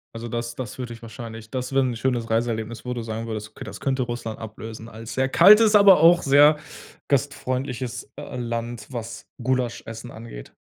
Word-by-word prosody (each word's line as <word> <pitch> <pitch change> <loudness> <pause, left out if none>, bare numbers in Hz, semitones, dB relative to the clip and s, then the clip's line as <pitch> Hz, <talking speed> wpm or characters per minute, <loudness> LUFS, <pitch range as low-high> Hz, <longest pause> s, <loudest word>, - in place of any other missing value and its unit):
Also, 115 +1 -5
das 115 0 -4
das 130 +1 -6
würde 125 -2 -5
dich 115 - -12
wahrscheinlich 115 -1 -9
das 130 -1 -3
wäre 135 0 +4
'n 125 -2 -1
schönes 120 -1 -1
Reiseerlebnis, 115 0 -1
wo 125 - -3
du 120 - -4
sagen 115 0 -5
würdest: 110 -1 -5
„Okay, - - -10
das - - -8
könnte 135 -1 0
Russland 120 -2 -5
ablösen 110 +1 -8
als 110 +1 -8
sehr 130 0 +1
kaltes, 210 +8 +7
aber 200 -5 +7
auch 170 +1 +7
sehr 145 +2 +6 0.5
gastfreundliches, 130 -3 -2
äh, 145 -2 -7
Land“, 120 -1 -4
was 115 -2 -6 0.2
Gulaschessen 120 -2 -2
angeht. 110 - -10
120 Hz, 180 wpm, -24 LUFS, 115-130 Hz, 0.5 s, kaltes